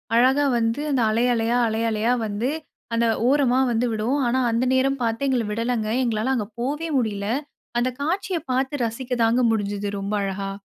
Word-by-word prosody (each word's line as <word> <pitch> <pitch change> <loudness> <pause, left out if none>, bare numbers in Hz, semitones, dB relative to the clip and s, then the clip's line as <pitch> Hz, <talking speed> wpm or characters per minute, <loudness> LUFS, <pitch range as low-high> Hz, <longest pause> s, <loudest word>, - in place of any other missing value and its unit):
அழகா 260 +4 +4
வந்து 230 +4 0
அந்த 265 -3 +2
அலை, 225 +2 +1
அலையா, 230 +1 +1
அலை, 220 0 -1
அலையா 220 +2 +1
வந்து 215 +4 -2 0.4
அந்த 230 0 +2 0.2
ஓரமா 260 -2 +3
வந்து 235 +1 +1
விடும். 230 +6 0
ஆனா 250 +2 +1
அந்த 230 +3 +1
நேரம் 270 +1 +2
பாத்து 230 +4 0
எங்கள 255 -3 +1
விடலங்க, 230 0 -1
எங்களால 230 +2 0
அங்க 215 -5 -2
போவே 295 +6 -2
முடியல. 205 -5 -1 0.5
அந்த 245 +1 +1
காட்சிய 365 +4 -1
பாத்து 265 +3 0
ரசிக்கதாங்க 240 0 0
முடிஞ்சது 205 -2 -2
ரொம்ப 200 +1 -3
அழகா. 195 0 -3
235 Hz, 165 wpm, -23 LUFS, 220-260 Hz, 0.5 s, அழகா